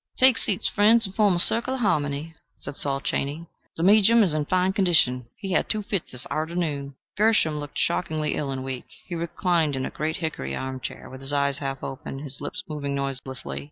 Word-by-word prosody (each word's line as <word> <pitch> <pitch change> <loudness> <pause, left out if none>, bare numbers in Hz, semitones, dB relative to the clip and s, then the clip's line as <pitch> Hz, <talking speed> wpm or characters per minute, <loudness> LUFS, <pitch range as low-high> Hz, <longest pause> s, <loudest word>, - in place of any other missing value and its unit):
"Take 260 -2 +6
seats, 195 - +1
friends, 225 +3 +4
and 190 - -6
form 205 -3 +3
a - - 0
circle 235 +8 +3
o' - - -3
harmony," 150 - 0 0.2
said - - -6
Saul 140 -1 -1
Chaney. 145 +4 -2 0.3
"The 165 - -1
me'jum 215 +4 +6
is 180 -6 +1
in 150 -1 0
fine 185 +3 +1
condition: 160 - +3
he 195 -2 -5
had - - +1
two 215 -1 0
fits 195 -3 -3
this 125 -1 0
arternoon." 155 -3 -2 0.2
Gershom 205 -8 +3
looked 145 -1 -7
shockingly 155 -3 0
ill 145 - -2
and 130 -1 -4
weak. 130 -1 -5 0.2
He 180 - -7
reclined 170 -2 0
in 130 0 -2
a - - -5
great 155 +1 -2
hickory 70 - -3
arm 130 0 -4
chair, - - -7
with 130 0 -10
his 135 +1 0
eyes 140 -1 +2
half 135 -2 -4
open, 135 0 -6
his 140 -1 -2
lips 180 - -3
moving 145 -3 -3
noiselessly. 135 -1 -4
155 Hz, 205 wpm, -25 LUFS, 140-185 Hz, 0.3 s, Take